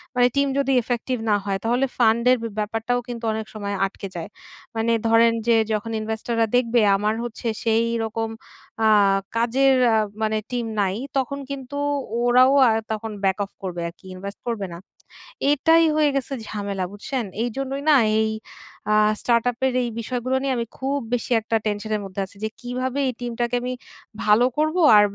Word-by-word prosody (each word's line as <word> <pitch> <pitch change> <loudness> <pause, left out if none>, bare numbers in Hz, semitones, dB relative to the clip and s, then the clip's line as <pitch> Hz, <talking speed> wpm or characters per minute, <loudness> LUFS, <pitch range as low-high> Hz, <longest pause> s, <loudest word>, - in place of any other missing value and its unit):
মানে 245 0 +5
টিম 280 0 +3
যদি 275 -1 +1
effective 240 +1 -2
না 210 - +4
হয় 195 -1 0
তাহলে 240 +4 +2
ফান্ড 235 -1 +3
এর 255 - +4
বে 230 - -2
ব্যাপারটাও 225 +3 -1
কিন্তু 240 -1 -6
অনেক 220 0 -3
সময় 200 -2 -4
আটকে 195 0 -6
যায়। 170 +2 -5 0.5
মানে 225 +1 +1 0.2
ধরেন 230 0 +5
যে 235 - +5 0.2
যখন 215 +2 -2
ইনভেস্টর 220 +2 -3
রা 225 - +4
দেখবে 240 -1 +3
আমার 210 +2 0
হচ্ছে 240 0 -5 0.2
সেইরকম 225 0 0 0.6
আ - - +6 0.5
কাজের 260 +4 +3 0.2
আ - - +4 0.3
মানে 220 0 +1
টিম 245 -1 -1 0.2
নাই, 190 -1 0 0.2
তখন 275 +1 -1
কিন্তু 275 0 -6 0.5
ওরাও 250 +2 +5 0.2
আ - - +4 0.2
তখন 220 0 -3
back 190 -1 +2
off 200 - -9
করবে 175 -2 -4
আরকি, 170 +3 -19
ইনভেস্ট 200 +2 -8
করবে 225 -4 -2
না। - - -7 0.7
এটাই 325 +3 +4
হয়ে 305 -1 +4
গেছে 275 0 -2
ঝামেলা 200 -2 -3
বুঝছেন? 245 +4 -4 0.2
এইজন্যই 270 +3 -3
না 300 - +7 0.3
এই 220 - +1 0.6
আ - - +4 0.3
স্টার্ট 235 -1 +2
আপ 235 - -18
এর 260 - +1
এই 240 - -2
বিষয়গুলো 250 +2 -2
নিয়ে 270 -1 0
আমি 235 - -1
খুব 275 +2 -1 0.2
বেশি 245 +1 -2
একটা 225 +1 -2
টেনশন 210 0 -2
এর 210 - -2
মধ্যে 195 0 -5
আছি। 190 - -16
যে 220 - 0
কিভাবে 255 +2 -3
এই 255 - -1
টিমটাকে 240 0 -2
আমি 250 +1 -3 0.5
ভালো 215 +3 +5
করব 310 +2 +1 0.2
আর 205 - +7
230 Hz, 180 wpm, -23 LUFS, 215-255 Hz, 0.7 s, না